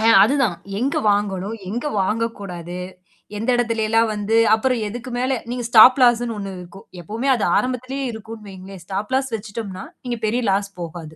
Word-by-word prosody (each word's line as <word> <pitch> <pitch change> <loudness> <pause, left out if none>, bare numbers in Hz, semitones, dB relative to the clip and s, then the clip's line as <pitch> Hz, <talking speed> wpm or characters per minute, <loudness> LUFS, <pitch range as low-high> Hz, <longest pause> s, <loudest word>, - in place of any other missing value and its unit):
ஆ, - - -1 0.2
அதுதான். 270 -9 +1 0.2
எங்கு 270 +4 0
வாங்கணும், 205 +1 -1
எங்க 235 +8 -3 0.2
வாங்கக்கூடாது? 195 -5 -3 0.6
எந்த 225 +4 -2
இடத்துல 230 -2 0
எல்லாம் 225 0 +3
வந்து, 210 +2 0 0.2
அப்புறம் 250 +2 0
எதுக்கு 240 +4 -7
மேல 260 +2 0 0.2
நீங்க 245 0 -3
ஸ்டாப் 245 +4 +8
லாஸ் 240 -1 +5
-ன்னு 230 -2 -3
ஒண்ணு 195 -1 -5
இருக்கும். 180 +2 -12 0.2
எப்பவுமே 225 +10 -4
அது 225 - -2
ஆரம்பத்திலேயே 255 +2 -2
இருக்குன்னு 220 -1 -9
வைங்களேன். 190 -1 -10
ஸ்டாப் 200 +4 -4
லாஸ் 265 -2 0
வெச்சுட்டோம்னா, 200 -3 -6 0.2
நீங்க 240 -1 -2
பெரிய 235 +4 0
லாஸ் 200 +1 0
போகாது. 160 -2 -7
220 Hz, 165 wpm, -21 LUFS, 195-245 Hz, 0.6 s, ஸ்டாப்